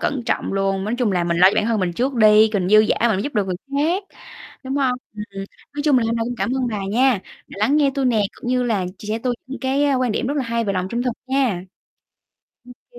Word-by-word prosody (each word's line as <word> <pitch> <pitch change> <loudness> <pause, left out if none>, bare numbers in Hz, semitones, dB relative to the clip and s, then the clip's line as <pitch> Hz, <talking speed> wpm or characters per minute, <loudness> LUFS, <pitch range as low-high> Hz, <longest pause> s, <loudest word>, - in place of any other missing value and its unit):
cẩn 275 -4 -1
trọng - - -1
luôn, 195 0 0
nói 215 - -1
chung 230 -5 +1
là 175 -2 +1
mình 170 0 0
lo 185 +2 +8
cho - - -4
bản 210 - +1
thân 225 -2 0
mình 180 -2 -1
trước 255 +8 -1
đi, 215 -1 +6
còn 190 -4 0
dư 215 +2 +7
giả 215 - +1
mình 200 -4 +1
giúp 290 - -5
được 205 -2 +1
người 185 -2 -2 0.2
khác, 320 +8 +1 0.6
đúng 265 +1 -3
không? 265 -3 +2 0.2
Ừm, 210 - -5
ừm, 195 0 -6 0.3
nói 290 - -3
chung 280 -4 +4
là 230 - 0
hôm 230 - 0
nay 225 - -1
cũng 245 +1 -4
cảm 240 - -1
ơn 255 - 0
bà 215 -3 -3
nha 245 -2 +3 0.3
đã - - -12
lắng 270 +8 +3
nghe 290 -2 +3
tui 275 - -1
nè, 230 -4 +2
cũng 240 - -8
như 250 0 +2
là 215 -7 0
chia 210 - -10
sẻ 220 +1 -1
tui 245 +1 -1
những 265 +1 -7
cái, 270 +2 +1
a, 280 - +2
quan 255 -3 0
điểm 230 - -1
rất 285 - -1
là 275 - +1
hay 230 0 -1
về 200 - -1
lòng 185 -1 -2
trung 235 +4 -2
thực 250 -1 -1
nha. 260 -9 0 1.3
Ô 485 - -15
235 Hz, 280 wpm, -21 LUFS, 205-265 Hz, 1.3 s, lo